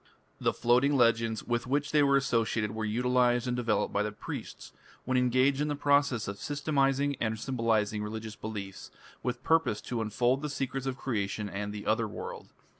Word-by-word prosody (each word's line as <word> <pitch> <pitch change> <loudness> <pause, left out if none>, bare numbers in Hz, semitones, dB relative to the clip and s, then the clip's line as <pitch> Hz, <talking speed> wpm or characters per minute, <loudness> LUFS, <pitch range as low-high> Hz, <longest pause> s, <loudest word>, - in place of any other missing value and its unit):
The - - +2
floating 125 +4 +3
legends 115 -2 +2
with 120 +1 -2
which 145 +3 0
they 150 - +4
were 140 -1 +5
associated 115 -5 0
were 110 0 -3
utilized 125 +2 +2
and 125 - 0
developed 115 -4 0
by 100 - +2
the 105 0 -1
priests, 105 - -8 0.3
when 130 - 0
engaged 130 +3 +3
in 150 - +1
the 145 - -1
process 140 -5 +2
of 100 0 -5
systematizing 140 -1 +1
and 110 -1 -1
symbolizing 110 -4 0
religious 110 0 -5
beliefs, 100 -4 -7 0.3
with 125 0 -3
purpose 160 -10 +2
to 120 -2 -3
unfold 120 +5 +1
the 150 - -3
secrets 135 -1 -3
of 130 -1 -2
creation 105 -5 -2
and 100 +1 -4
the 105 0 -7
Otherworld. 110 0 -2
120 Hz, 175 wpm, -30 LUFS, 110-135 Hz, 0.3 s, were